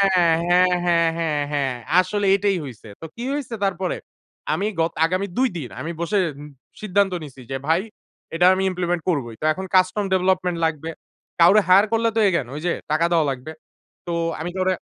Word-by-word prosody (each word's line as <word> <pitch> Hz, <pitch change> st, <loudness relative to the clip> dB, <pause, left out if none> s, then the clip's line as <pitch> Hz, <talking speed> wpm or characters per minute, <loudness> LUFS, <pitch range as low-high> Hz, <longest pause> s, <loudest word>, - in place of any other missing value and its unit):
হ্যাঁ, 175 Hz, +1 st, +3 dB
হ্যাঁ, 170 Hz, -1 st, +3 dB
হ্যাঁ, 155 Hz, -3 st, -1 dB
হ্যাঁ। 135 Hz, -3 st, 0 dB, 0.3 s
আসলে 200 Hz, +3 st, 0 dB
এটাই 200 Hz, -1 st, +1 dB
হইছে। 120 Hz, -4 st, -11 dB
তো -, -, -6 dB
কি 235 Hz, -, -7 dB
হইছে 275 Hz, -5 st, -4 dB
তারপরে? 190 Hz, -1 st, -1 dB, 0.6 s
আমি 200 Hz, -, -1 dB, 0.2 s
গত 165 Hz, -, 0 dB
আগামী 185 Hz, +4 st, -1 dB
২ 260 Hz, 0 st, +3 dB
দিন 135 Hz, -7 st, -6 dB
আমি 165 Hz, -, -4 dB
বসে 185 Hz, +5 st, 0 dB, 0.6 s
সিদ্ধান্ত 200 Hz, -1 st, +1 dB
নিচ্ছি, 135 Hz, -3 st, -11 dB
যে 135 Hz, -, -1 dB
ভাই 165 Hz, +3 st, +3 dB, 0.5 s
এটা 175 Hz, -, +3 dB
আমি 190 Hz, 0 st, -1 dB
ইমপ্লিমেন্ট 175 Hz, -1 st, -2 dB
করবই। 120 Hz, -9 st, -2 dB
তো -, -, -2 dB
এখন 190 Hz, +4 st, -6 dB
কাস্টম 185 Hz, +3 st, +3 dB
ডেভেলপমেন্ট 185 Hz, -1 st, +1 dB
লাগবে। 160 Hz, 0 st, -3 dB, 0.5 s
কাউরে 195 Hz, +5 st, +7 dB
হায়ার 195 Hz, +3 st, +6 dB
করলে 230 Hz, 0 st, +2 dB
তো -, -, +2 dB
again 170 Hz, -9 st, -1 dB
ওই 150 Hz, -, -4 dB
যে 175 Hz, -, +1 dB, 0.2 s
টাকা 155 Hz, +2 st, +2 dB
দেওয়া 165 Hz, -2 st, +3 dB
লাগবে। 135 Hz, +4 st, -7 dB, 0.6 s
তো 175 Hz, -, -2 dB, 0.3 s
আমি 165 Hz, +3 st, -3 dB
কাউরে, 185 Hz, 0 st, +1 dB
175 Hz, 175 wpm, -22 LUFS, 160-190 Hz, 0.6 s, কাউরে